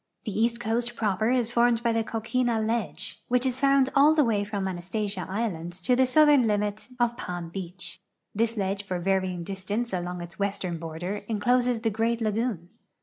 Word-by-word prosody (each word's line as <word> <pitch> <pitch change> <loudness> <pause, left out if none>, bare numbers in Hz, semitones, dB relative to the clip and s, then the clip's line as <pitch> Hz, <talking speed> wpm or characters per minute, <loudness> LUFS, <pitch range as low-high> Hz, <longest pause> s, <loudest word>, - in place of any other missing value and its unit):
The 210 - -5
east 230 +1 +1
coast 235 +1 -1
proper 215 0 0
is 245 -2 +1
formed 235 -1 +3
Ijy 235 -1 +2
the 225 0 +1
coquina 230 +1 0
ledge, 220 -2 -3
which 250 +1 +2
is 255 0 0
found 275 -1 +4
all 295 +3 +6
the 305 - +5
way 215 -5 +1
from 200 -2 -3
Anastasia 190 +3 -3
island 185 -5 -3
to 185 +8 +1
the 260 +1 +4
southern 295 +1 +6
limit 210 +1 -1
of 240 0 +2
Palm 175 -5 -5
beach. 180 -1 -8 0.3
This 230 +2 0
ledge 195 0 -1
for 185 -2 -3
vaiying 185 -1 0
distance 195 +5 -3
along 180 0 -3
its 175 +3 -10
western 195 -4 -2
border 170 +5 -4
incloses 245 +2 +2
the 225 -1 +1
great 225 +2 0
lagoon. 215 -5 -1
215 Hz, 180 wpm, -27 LUFS, 190-240 Hz, 0.3 s, all